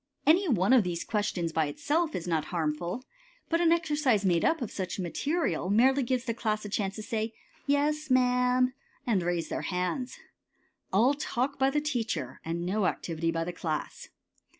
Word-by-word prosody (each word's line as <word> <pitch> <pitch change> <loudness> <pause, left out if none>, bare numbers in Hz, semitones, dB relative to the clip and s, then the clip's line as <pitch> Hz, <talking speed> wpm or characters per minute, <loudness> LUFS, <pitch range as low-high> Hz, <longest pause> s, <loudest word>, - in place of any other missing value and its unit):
Any 350 +6 +5
one 205 -1 +3
of 250 -5 +6
these 175 -2 -3
questions 200 -6 -1
by 160 -2 +2
itself 310 - -1
is 175 - -4
not 160 -3 0
harmful, 170 +8 -2 0.4
but 335 +1 +2
an 335 -1 +4
exercise 295 - +2
made 175 -3 +3
up 325 - +2
of 240 -6 -4
such 185 -3 -4
material 185 - -1
merely 260 +7 +4
gives 250 -1 0
the 235 - -2
class 215 -2 -2
a - - -5
chance 195 -1 -1
to 215 - -6
say, 225 -1 -2 0.3
"Yes, 300 +2 +1
ma'am," 250 0 +3 0.3
and 215 -6 +2
raise 175 -1 -1
their - - -2
hands. 180 +8 -2 0.7
All 230 +9 +4
talk 275 -1 -2
by 265 0 +4
the 295 +2 0
teacher 225 - -3
and 170 +1 -3
no 195 +1 +1
activity 165 -1 -2
by 165 0 0
the 175 +1 -4
class. 160 -3 -4
220 Hz, 175 wpm, -29 LUFS, 175-270 Hz, 0.7 s, of